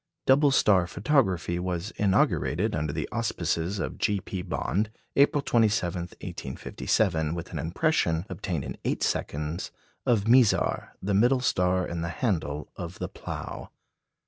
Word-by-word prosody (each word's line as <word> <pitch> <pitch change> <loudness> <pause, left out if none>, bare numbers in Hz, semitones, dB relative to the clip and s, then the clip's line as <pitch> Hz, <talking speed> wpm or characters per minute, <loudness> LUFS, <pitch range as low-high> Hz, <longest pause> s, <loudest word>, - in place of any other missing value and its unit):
Double 145 +2 +5
star 100 -9 +4
photography 95 - +1
was 90 +3 -3
inaugurated 95 -2 +1
under 75 -1 -1
the - - -3
auspices 85 +5 -1
of 95 - -4
G. 105 -2 +1
P. 95 0 -5
Bond, 100 +3 -1 0.3
April 140 +1 +4
27, 105 -8 +2 0.6
1857, 80 -7 0
with 85 +1 -6
an 80 - -3
impression, 85 - +1
obtained 85 -11 -3
in 65 -4 -6
eight - - -1
seconds, 75 +5 -2 0.4
of 110 -4 +2
Mizar, 120 -2 +3
the 100 +1 0
middle 120 +6 +4
star 90 -6 +1
in 85 -1 -4
the 85 - -2
handle 80 - -2
of 90 -1 -7
the - - -3
Plough. - - -7
90 Hz, 140 wpm, -27 LUFS, 85-110 Hz, 0.6 s, Double